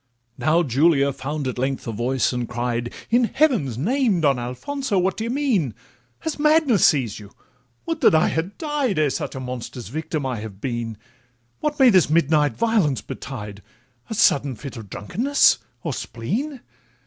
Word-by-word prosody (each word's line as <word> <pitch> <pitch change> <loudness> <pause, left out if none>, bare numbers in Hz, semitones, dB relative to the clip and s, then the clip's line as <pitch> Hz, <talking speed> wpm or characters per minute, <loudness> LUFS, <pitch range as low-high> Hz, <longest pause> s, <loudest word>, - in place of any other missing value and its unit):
Now 155 +6 +3
Julia 140 0 +3
found 140 +1 -4
at 125 -1 -4
length 135 +1 -2
a 115 - -3
voice, 125 +4 0
and 125 -1 -3
cried, 120 0 -2 0.2
'In 240 +1 +4
heaven's 230 - +1
name, 220 - +1
Don 140 -4 +3
Alfonso, 200 - -3
what 185 +1 +1
d' - - -6
ye 230 - -2
mean? 235 - 0 0.5
Has 320 -2 -4
madness 300 - +4
seized 125 -10 0
you? 100 -2 -12 0.6
would 325 -1 -3
that - - +6
I 155 - +4
had 170 +5 -3
died 295 - -1
Ere 150 -3 +2
such - - -4
a - - -4
monster's 125 -1 -6
victim 155 +1 -3
I 125 -4 -2
had 105 -3 -8
been! 120 -2 -3 0.6
What 300 -1 -1
may 260 -3 +7
this 185 -7 +4
midnight 155 -2 +2
violence 215 - +2
betide, 105 -6 -7 0.5
A 220 - -3
sudden 140 - +3
fit 140 +3 -8
of 110 -4 -9
drunkenness 245 - +2 0.2
or 160 - -2
spleen? 230 - -4
150 Hz, 170 wpm, -22 LUFS, -, 0.6 s, may